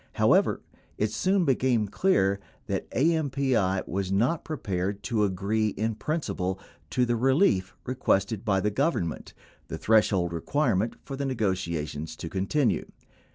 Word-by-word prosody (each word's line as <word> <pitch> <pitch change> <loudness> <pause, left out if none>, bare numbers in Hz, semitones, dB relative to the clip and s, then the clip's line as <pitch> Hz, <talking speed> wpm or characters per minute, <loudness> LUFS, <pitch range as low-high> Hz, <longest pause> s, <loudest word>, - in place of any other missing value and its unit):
However, - - +3 0.4
it 105 0 0
soon 185 - +1
became 125 -5 +2
clear 100 - +2 0.3
that - - -3
AMPI 135 - +1
was 95 +1 -2
not 120 +12 +1
prepared 100 - -3
to 115 -4 +1
agree 100 +3 0
in 110 +2 -1
principle 105 - -2 0.3
to 125 - +2
the 120 0 +1
relief 125 - +2
requested 110 -5 0
by 100 -4 +1
the 105 +2 0
Government 105 - -1 0.2
— - - -32
the - - -5
threshold 100 -6 +2
requirement 115 - 0
for 135 - -6
the 140 +1 -3
nego 115 -7 +1
tiations 80 -4 -4
to 80 - -6
continue. 100 - 0
110 Hz, 140 wpm, -27 LUFS, 95-130 Hz, 0.4 s, However